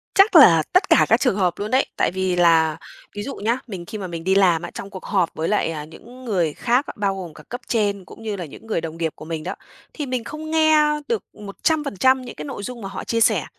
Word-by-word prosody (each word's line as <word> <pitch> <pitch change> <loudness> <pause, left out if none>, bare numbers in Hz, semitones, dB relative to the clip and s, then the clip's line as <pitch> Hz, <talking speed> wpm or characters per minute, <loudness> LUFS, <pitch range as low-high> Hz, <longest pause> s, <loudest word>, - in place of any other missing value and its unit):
Chắc 390 -1 +5
là 165 - +8
tất 365 - +3
cả - - +6
các - - +5
trường 250 -7 +1
hợp 180 -3 +2
luôn 210 +3 -4
đấy. 260 +1 +3
Tại - - +2
vì 185 -1 -1
là 165 -3 +4 0.4
ví 205 - -4
dụ 275 - -6
nhá, 230 +4 0
mình 185 -5 -7
khi 215 - -7
mà 190 -3 -5
mình 165 -1 -6
đi 190 +1 +2
làm 180 -4 +4
á, 175 - -7
trong 200 - -7
cuộc 190 - -10
họp 185 -5 +1
với 160 +1 -2
lại, 210 -5 +1
à, 150 -2 -5
những 245 +11 -14
người 175 -9 0
khác, 250 +4 +1
bao 200 -2 0
gồm 175 -4 -7
cả - - -14
cấp 245 +2 -6
trên 205 -4 0
cũng 225 - -13
như 215 -2 -3
là 180 -3 -5
những 190 +9 -13
người 190 -7 -1
đồng 165 0 -6
nghiệp 165 -2 -2
của - - -11
mình 160 -1 -4
đó, 185 +3 -4 0.4
thì 295 - -4
mình 255 -3 -3
không 310 +4 -7
nghe 315 -1 +5 0.2
được 460 -3 -1
100% 260 - 0
những 245 - -9
cái 150 - -7
nội 205 - -6
dung 245 -1 -6
mà 195 - -5
họ - - -6
chia 230 0 -1
sẻ. - - +3
200 Hz, 265 wpm, -22 LUFS, 175-250 Hz, 0.4 s, là